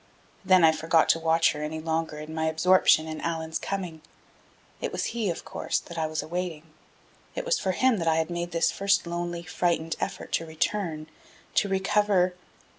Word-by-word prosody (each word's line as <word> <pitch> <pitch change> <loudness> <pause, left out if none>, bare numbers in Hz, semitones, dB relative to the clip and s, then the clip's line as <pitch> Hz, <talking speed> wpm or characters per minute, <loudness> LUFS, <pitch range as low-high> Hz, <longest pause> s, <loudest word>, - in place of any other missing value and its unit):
Then 185 -2 +5
I 160 - +8
forgot 160 +1 +2
to 165 - +4
watch 165 0 +3
her 150 - -6
any 155 +1 -4
longer 160 -1 -2
in 155 +1 -7
my 160 0 -1
absorption 160 0 +4
in 155 -1 -5
Allan's 160 -1 -2
coming. 180 -5 -4 0.8
It - - -2
was - - -2
he, 225 -4 -1
of 170 - -4
course, - - -2
that 170 - -7
I 160 -1 -1
was 155 0 -3
awaiting. 170 -2 -4 0.7
It - - -3
was - - +2
for 190 - -1
him 255 +2 +3
that 165 -3 -2
I 160 - +4
had 160 +1 0
made 175 0 -3
this 165 -1 +1
first 200 -1 +1
lonely, 170 0 -4
frightened 170 -1 -1
effort - - -4
to 165 - 0
return, 160 -1 -2 0.5
to 200 - +2
recover.... 190 -1 +2
165 Hz, 190 wpm, -27 LUFS, 160-185 Hz, 0.8 s, I